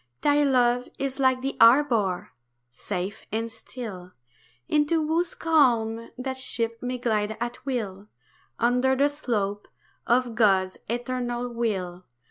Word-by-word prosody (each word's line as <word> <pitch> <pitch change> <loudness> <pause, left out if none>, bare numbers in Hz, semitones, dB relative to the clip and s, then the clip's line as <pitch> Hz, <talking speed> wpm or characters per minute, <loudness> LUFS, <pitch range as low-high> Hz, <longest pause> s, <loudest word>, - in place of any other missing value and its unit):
Thy 290 0 +3
love 250 -2 +2
is 275 0 -3
like 260 -1 +3
the 270 - -2
harbour, 230 - +4 0.4
safe 180 - -5
and 225 +1 -2
still, 215 -6 -9 0.5
Into 305 +1 +2
whose 335 +3 0
calm 235 -8 +2
that 260 +1 -4
ship 230 -3 -1
may 250 0 -3
glide 220 -3 -1
at 240 +1 -4
will, 210 -6 -3 0.5
Under 250 +3 +2
the 280 +2 +3
slope 210 -8 -2 0.4
of 245 0 +2
God's 195 -4 +2
Eternal 245 0 -2
Will. 190 -7 -3
240 Hz, 120 wpm, -26 LUFS, 220-260 Hz, 0.5 s, harbour